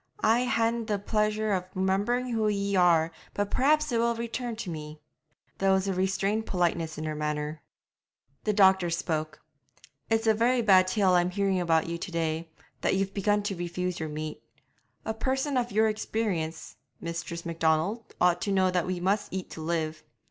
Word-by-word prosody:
'I 235 +3 +4
haena 230 -1 +1
the 210 -2 0
pleasure 215 +1 0
of 180 -1 -1
remembering 205 +7 0
who 225 -2 +1
ye 200 -1 0
are, 170 -3 +4 0.2
but 205 0 -1
perhaps 305 +2 +3
it 235 - +1
will 235 0 +2
return 235 +1 -4
to 220 -4 -5
me.' 150 -1 -7 0.6
There 195 0 +3
was 190 0 +2
restrained 195 +3 0
politeness 170 -3 0
in 155 - -4
her 155 -1 -2
manner. 150 0 -3 0.8
The 215 - +1
doctor 190 -3 +4
spoke. 155 -2 -2 0.7
'It's 225 0 +1
a 220 - +5
very 235 +3 +2
bad 190 -3 +6
tale 190 -1 +2
I'm 175 0 +3
hearing 195 0 0
about 165 -3 +2
you 170 0 -4
to 180 - -6
day, 165 0 -2 0.3
that - - +2
you've 195 0 -1
begun 205 +1 +1
to 205 -1 -2
refuse 175 +1 -3
your 160 -1 -3
meat. 155 +1 -5 0.6
A 220 - -1
person 265 +5 -1
of 240 -1 0
your 220 +2 +3
experience, 205 -7 -3 0.2
Mistress 170 0 -5
Macdonald, 165 +6 0
ought 175 -1 +3
to 200 - -1
know 190 -1 +3
that 180 -2 0
we 185 -1 -2
must 195 +4 0
eat 190 -1 -5
to 160 - -7
live.' 160 -1 -2
190 Hz, 175 wpm, -28 LUFS, 170-220 Hz, 0.8 s, bad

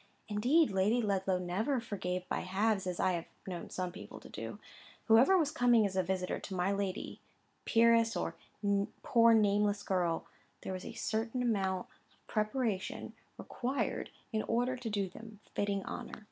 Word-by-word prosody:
Indeed, 245 +8 +3
Lady 195 +5 +2
Ludlow 195 -4 +1
never 195 +10 0
forgave 185 -5 -3
by - - -1
halves, 195 +1 0
as 180 -1 -3
I 185 - +3
have 170 -2 -3 0.2
known 180 -3 -5
some 180 -1 -3
people 200 +3 -10
do. - - -7 0.5
Whoever 245 +12 +6
was 305 -5 +2
coming 245 -6 +4
as 190 -2 -2
a 190 - +3
visitor 185 0 -2
to 190 - -6
my 180 +2 +1
lady, 200 -1 -3 0.5
peeress, 230 0 +4
or - - -3 0.7
poor 230 -1 +6
nameless 205 -1 +3
girl, 175 -4 0 0.4
there 190 - -4
was 185 - -6
a - - -6
certain 230 +2 -1
amount 190 -5 0 0.3
of - - -37
preparation 215 -2 -1 0.2
required 260 +3 -2 0.2
in 215 - +1
order 245 +4 0
to 245 -2 -5
do 200 -2 0
them 215 +3 -11
fitting 200 -1 -1
honour. - - -6
205 Hz, 160 wpm, -33 LUFS, 190-230 Hz, 0.7 s, Whoever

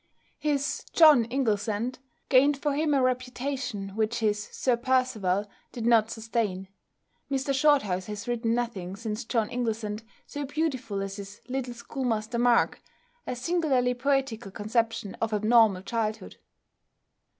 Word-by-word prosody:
His 290 -1 -1
"John 300 -8 +7
Inglesant" 230 -1 -1 0.3
gained 280 +2 +5
for 290 +1 -1
him 300 -1 +2
a 270 - +3
reputation 255 -4 -2
which 220 +3 -1
his 210 -2 0
"Sir 250 -2 +1
Percival" 235 -6 +1 0.2
did 235 -2 -5
not 225 -2 +4
sustain. 220 -5 -2 0.6
Mr 275 0 0
Shorthouse 265 -11 +2
has 210 +1 -6
written 235 -1 0
nothing 200 -7 -3
since 220 +2 -4
"John 225 -2 0
Inglesant" 220 -3 -2 0.2
so 290 - -5
beautiful 265 -9 -2
as 195 +1 -5
his 200 0 -9
"Little 255 -2 -3
Schoolmaster 235 -2 -2
Mark," 240 -1 +3 0.5
a - - -2
singularly 265 -3 +1
poetical 250 -4 -1
conception 225 +1 -1
of 225 -1 0
abnormal 215 -3 +4
childhood. 215 -1 -3
235 Hz, 130 wpm, -27 LUFS, 215-260 Hz, 0.6 s, John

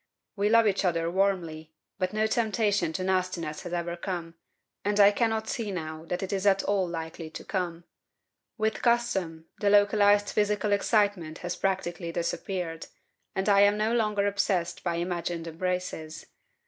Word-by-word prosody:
We 205 0 +1
love 230 0 +5
each 200 -2 +1
other 170 -2 +1
warmly, 170 -5 -1 0.2
but 185 -1 0
no 215 +1 +1
temptation 215 -5 +1
to 185 - -2
nastiness 185 -4 -1
has 175 - -7
ever 170 0 -2
come, 175 -2 -5 0.5
and 205 +1 0
I 200 0 +8
cannot 220 0 0
see 225 -3 -3
now 160 -3 -5
that 180 +3 -3
it 190 - -3
is 195 +1 0
at 195 -1 +4
all 195 -2 +1
likely 165 -1 -6
to - - -9
come. 175 -3 -3 0.7
With 220 0 -1
custom, 190 -10 0
the 205 - +2
localized 205 0 +4
physical 210 0 +1
excitement 200 -6 +1
has 175 - -2
practically 175 -3 -2
disappeared, 170 0 -3 0.5
and 190 +1 -1
I 200 -1 +5
am 205 +1 +5
no 215 +2 +1
longer 210 -3 +1
obsessed 200 -4 0
by 175 -2 -1
imagined 170 -1 -3
embraces. 170 -2 -4
190 Hz, 160 wpm, -28 LUFS, 170-205 Hz, 0.7 s, I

